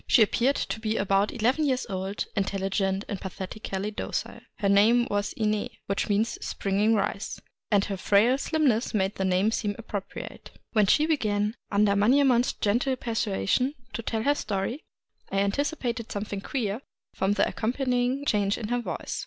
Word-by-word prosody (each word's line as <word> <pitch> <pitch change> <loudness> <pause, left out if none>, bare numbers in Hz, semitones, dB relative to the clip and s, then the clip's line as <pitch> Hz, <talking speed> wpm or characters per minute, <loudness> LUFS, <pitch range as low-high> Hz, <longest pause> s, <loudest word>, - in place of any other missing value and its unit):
She 230 - +6
appeared 250 +6 +2
to 220 - -3
be 220 0 -1
about 195 +1 +2
eleven 250 +6 +1
years 260 -3 +1
old, 190 0 -3
intelligent, 195 0 0
and 200 - -4
pathetically 190 +1 -5
docile. - - -4 0.2
Her 200 - -1
name 220 +5 +5
was 205 0 0
Ine, 215 -1 0 0.2
which 200 +2 -1
means 210 +3 +1
" - - -28
springing 205 +3 +1
rice; 200 -1 -2 0.2
" - - -51
and 205 -1 +4
her 195 - -3
frail 220 +8 +3
slimness 275 -9 +1
made 195 -1 +1
the 190 - 0
name 190 +3 +2
seem 205 -2 -1
appropriate. 205 -4 -7 0.2
When 210 -3 +4
she 300 +9 +4
began, 215 -9 +1 0.2
under 200 0 +3
Manyemon' 250 +4 +4
s - - -1
gentle 245 +6 +1
persuasion, 230 - 0 0.2
to - - -3
tell 220 -1 -2
her 285 - +4
story, 215 +2 -3 0.5
I 195 - -1
anticipated 235 +2 -1
some 205 +1 -3
thing 200 -2 -5
queer 225 -2 -2 0.3
from 195 +1 +1
the 205 0 +2
accompanying 250 +3 0
change 205 -5 +1
in 215 - -5
her 245 0 +1
voice. 240 - -4
215 Hz, 170 wpm, -27 LUFS, 200-245 Hz, 0.5 s, She